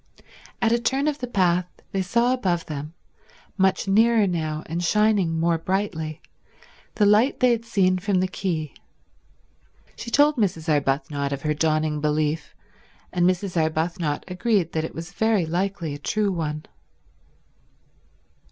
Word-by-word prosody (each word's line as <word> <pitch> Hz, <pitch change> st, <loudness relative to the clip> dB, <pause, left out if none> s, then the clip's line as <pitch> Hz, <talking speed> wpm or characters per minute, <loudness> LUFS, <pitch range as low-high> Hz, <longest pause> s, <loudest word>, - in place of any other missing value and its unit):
At 225 Hz, -, +3 dB
a 235 Hz, -, +3 dB
turn 270 Hz, +4 st, 0 dB
of 300 Hz, -1 st, -1 dB
the 250 Hz, -, -4 dB
path 180 Hz, -5 st, +1 dB, 0.2 s
they 195 Hz, -2 st, 0 dB
saw 235 Hz, +6 st, +2 dB
above 180 Hz, -9 st, -1 dB
them, 150 Hz, +2 st, -6 dB, 0.6 s
much 190 Hz, -1 st, +1 dB
nearer 220 Hz, +2 st, +4 dB
now 155 Hz, -4 st, -2 dB
and 170 Hz, +2 st, -3 dB
shining 200 Hz, -4 st, +2 dB
more 165 Hz, 0 st, +1 dB
brightly, 165 Hz, -4 st, -3 dB, 0.7 s
the 210 Hz, -, +3 dB
light 210 Hz, +6 st, +4 dB
they 250 Hz, -1 st, +4 dB
had 230 Hz, -1 st, -1 dB
seen 185 Hz, -5 st, +2 dB
from 195 Hz, 0 st, +1 dB
the 185 Hz, -, +1 dB
quay. 170 Hz, -6 st, -3 dB, 1.2 s
She -, -, -7 dB
told 290 Hz, +3 st, +4 dB
Mrs. 175 Hz, -7 st, -1 dB
Arbuthnot 140 Hz, 0 st, 0 dB
of 140 Hz, -1 st, -4 dB
her 150 Hz, -1 st, +1 dB
dawning 155 Hz, -1 st, 0 dB
belief, 150 Hz, 0 st, -1 dB, 0.6 s
and 175 Hz, 0 st, +3 dB
Mrs. 185 Hz, 0 st, -2 dB
Arbuthnot 160 Hz, -1 st, -1 dB
agreed 190 Hz, -2 st, 0 dB
that 160 Hz, -, -1 dB
it 160 Hz, -, -6 dB
was 165 Hz, +1 st, -7 dB
very 220 Hz, -5 st, +2 dB
likely 175 Hz, -1 st, -2 dB
a 145 Hz, -, -7 dB
true 205 Hz, +6 st, 0 dB
one. 155 Hz, -3 st, -3 dB
180 Hz, 145 wpm, -24 LUFS, 155-210 Hz, 1.2 s, nearer